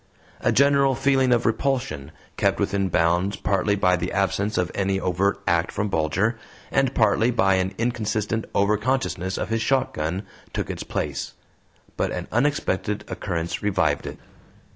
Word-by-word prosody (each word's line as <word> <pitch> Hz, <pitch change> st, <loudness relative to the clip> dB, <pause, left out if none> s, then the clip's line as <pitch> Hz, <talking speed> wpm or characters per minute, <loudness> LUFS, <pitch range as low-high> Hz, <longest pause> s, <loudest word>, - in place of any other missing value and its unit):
A -, -, +1 dB
general 140 Hz, -1 st, +4 dB
feeling 135 Hz, -1 st, +2 dB
of 120 Hz, -1 st, +3 dB
repulsion, 115 Hz, -, -1 dB, 0.2 s
kept -, -, +1 dB
within 95 Hz, -1 st, 0 dB
bounds 90 Hz, +3 st, +2 dB
partly 100 Hz, +1 st, +1 dB
by 90 Hz, -2 st, +3 dB
the 90 Hz, +1 st, -3 dB
absence 100 Hz, +2 st, 0 dB
of 90 Hz, -1 st, 0 dB
any 95 Hz, -1 st, 0 dB
overt 95 Hz, +2 st, 0 dB
act 85 Hz, 0 st, +1 dB
from 105 Hz, 0 st, -2 dB
Bulger, 95 Hz, +7 st, 0 dB, 0.3 s
and 135 Hz, -1 st, +1 dB
partly 110 Hz, +1 st, +3 dB
by 95 Hz, -5 st, +3 dB
an 95 Hz, +1 st, 0 dB
inconsistent 110 Hz, -2 st, -1 dB
over 100 Hz, +1 st, +3 dB
consciousness 105 Hz, -6 st, -1 dB
of -, -, -3 dB
his 115 Hz, 0 st, 0 dB
shotgun, 110 Hz, -, 0 dB, 0.3 s
took -, -, -2 dB
its -, -, -6 dB
place. -, -, -3 dB, 0.6 s
But -, -, 0 dB
an -, -, -4 dB
unexpected 110 Hz, -6 st, 0 dB
occurrence 85 Hz, -3 st, -3 dB
revived 100 Hz, -3 st, +1 dB
it. -, -, -7 dB
100 Hz, 150 wpm, -24 LUFS, 95-120 Hz, 0.6 s, general